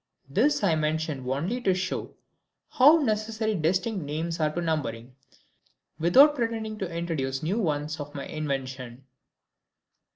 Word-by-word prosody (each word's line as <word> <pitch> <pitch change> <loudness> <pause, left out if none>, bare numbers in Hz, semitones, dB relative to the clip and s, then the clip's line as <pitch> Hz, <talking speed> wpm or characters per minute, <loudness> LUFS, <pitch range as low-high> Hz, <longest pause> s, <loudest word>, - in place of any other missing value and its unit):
This 255 - +2
I 185 -5 +4
mention 155 -4 -1
only 170 - -1
to 190 -5 +2
show 185 0 -4 0.6
how 290 +6 +7
necessary 220 -4 -1
distinct 185 +3 0
names 160 +3 -3
are 155 -1 +2
to 170 - -3
numbering, 130 -7 -3 0.8
without 265 - +6
pretending 225 -4 -3
to 190 -3 -3
introduce 155 -6 -3
new 190 +8 0
ones 155 -4 -1
of 145 0 -7
my 140 - -5
invention. 135 -4 -5
165 Hz, 130 wpm, -27 LUFS, 145-215 Hz, 0.8 s, how